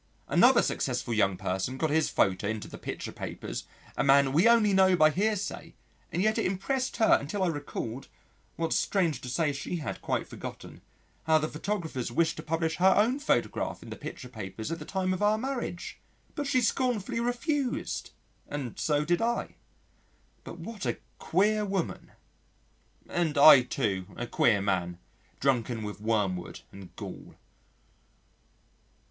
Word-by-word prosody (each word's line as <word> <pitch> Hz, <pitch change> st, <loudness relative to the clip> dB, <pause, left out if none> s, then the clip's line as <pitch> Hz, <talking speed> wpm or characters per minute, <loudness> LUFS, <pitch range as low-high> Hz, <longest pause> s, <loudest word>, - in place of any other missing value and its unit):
Another -, -, +5 dB
successful 120 Hz, -, -1 dB
young 95 Hz, -4 st, +2 dB
person 95 Hz, +7 st, -2 dB
got 155 Hz, +1 st, 0 dB
his 160 Hz, 0 st, +2 dB
photo 95 Hz, +1 st, +1 dB
into 110 Hz, -1 st, -3 dB
the -, -, -10 dB
picture -, -, -5 dB
papers -, -, -6 dB, 0.3 s
a -, -, 0 dB
man 135 Hz, 0 st, +5 dB
we 165 Hz, +8 st, +4 dB
know 235 Hz, 0 st, +8 dB
only 190 Hz, -4 st, +4 dB
by 155 Hz, -2 st, +5 dB
hearsay, 205 Hz, +3 st, -2 dB, 0.4 s
and 175 Hz, +2 st, 0 dB
yet 215 Hz, 0 st, +2 dB
it -, -, 0 dB
impressed 250 Hz, +8 st, -2 dB
her 220 Hz, -, +5 dB
until 180 Hz, +8 st, -2 dB
I -, -, +2 dB
recalled, 140 Hz, -5 st, -5 dB, 0.5 s
what 165 Hz, -1 st, -1 dB
strange 175 Hz, -6 st, +1 dB
to 125 Hz, -, -6 dB
say 150 Hz, +2 st, 0 dB
she 140 Hz, +5 st, -4 dB
had 150 Hz, -8 st, -5 dB
quite -, -, -2 dB
forgotten, -, -, -9 dB, 0.4 s
how 160 Hz, 0 st, +5 dB
the 155 Hz, 0 st, 0 dB
photographers 160 Hz, -, -3 dB
wished 160 Hz, +5 st, +1 dB
to -, -, -5 dB
publish 160 Hz, 0 st, -1 dB
her 190 Hz, +1 st, +5 dB
own 235 Hz, +7 st, +3 dB
photograph 295 Hz, -, -1 dB
in -, -, -10 dB
the -, -, -5 dB
picture 125 Hz, -, -8 dB
papers 110 Hz, -, -6 dB
at 165 Hz, -, -3 dB
the 150 Hz, -, -8 dB
time 185 Hz, 0 st, -1 dB
of 185 Hz, -, -4 dB
our 210 Hz, +1 st, +3 dB
marriage. 245 Hz, -7 st, -4 dB, 0.3 s
But 290 Hz, -2 st, -3 dB
she 255 Hz, -2 st, +2 dB
scornfully 235 Hz, -3 st, 0 dB
refused. 245 Hz, +3 st, -1 dB, 0.4 s
(And 140 Hz, -5 st, -5 dB
so 150 Hz, -1 st, +1 dB
did 175 Hz, +4 st, +1 dB
I.) 235 Hz, +1 st, -1 dB, 0.9 s
But -, -, -9 dB
what 225 Hz, -4 st, -8 dB
a -, -, -1 dB, 0.2 s
queer 210 Hz, +4 st, +2 dB
woman!... 195 Hz, -4 st, -3 dB, 1.0 s
[And 165 Hz, -4 st, -1 dB
I, 140 Hz, -1 st, +10 dB
too, 105 Hz, -7 st, -2 dB
a 120 Hz, -, -3 dB
queer 110 Hz, -3 st, +2 dB
man, 90 Hz, -3 st, -1 dB, 0.4 s
drunken 120 Hz, -4 st, 0 dB
with 105 Hz, 0 st, -6 dB
wormwood 100 Hz, -5 st, -1 dB
and 95 Hz, -2 st, -12 dB
gall. -, -, -9 dB
160 Hz, 160 wpm, -29 LUFS, -, 1.0 s, I